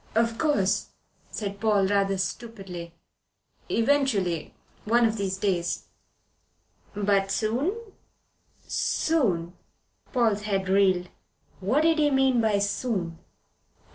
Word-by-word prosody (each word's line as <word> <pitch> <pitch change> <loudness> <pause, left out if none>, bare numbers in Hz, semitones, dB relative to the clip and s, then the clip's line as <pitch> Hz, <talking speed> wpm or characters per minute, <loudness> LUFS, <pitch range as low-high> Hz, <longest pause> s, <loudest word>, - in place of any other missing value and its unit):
"Of 230 0 +1
course," 285 -12 +1 0.4
said 200 -2 -5
Paul, 210 -2 +3
rather 195 0 +1
stupidly. 190 -5 -5 0.7
"Eventually. 225 - +1 0.3
One 235 +2 +3
of 220 -1 +1
these 195 -3 -2
days." 185 -4 -1 1.1
"But 200 -1 +1
soon?" 245 - 0 0.9
"Soon?" 190 - 0 0.6
Paul's 225 -6 +2
head 195 -2 -1
reeled. 190 -2 +3 0.5
What 220 +11 +2
did 325 0 +3
he 295 -1 +4
mean 265 -3 +3
by 215 -2 +2
soon? 200 -4 -2
205 Hz, 100 wpm, -26 LUFS, 190-235 Hz, 1.1 s, he